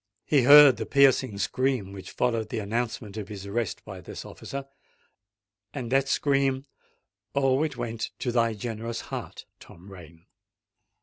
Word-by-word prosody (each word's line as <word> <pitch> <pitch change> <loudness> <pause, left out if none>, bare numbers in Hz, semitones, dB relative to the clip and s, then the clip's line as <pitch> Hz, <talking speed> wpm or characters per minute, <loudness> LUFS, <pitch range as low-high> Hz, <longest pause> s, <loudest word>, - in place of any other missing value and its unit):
He 145 -3 +3
heard 145 +1 +9
the - - -5
piercing 135 -5 +3
scream 125 0 -1
which 95 -1 -9
followed 115 -3 -1
the - - -4
announcement 110 0 -3
of 105 -2 -5
his 100 -2 -8
arrest 110 +2 -3
by - - -9
this - - -9
officer; 140 0 -7 1.1
and 125 -4 -5
that 135 0 +2
scream—oh! 135 -2 -1
it 150 -5 -2
went 115 -2 -4
to 125 - -2
thy 115 -2 +1
generous 115 +1 -5
heart, - - -7
Tom 90 +4 -15
Rain! 85 -2 -14
120 Hz, 140 wpm, -26 LUFS, 105-135 Hz, 1.1 s, heard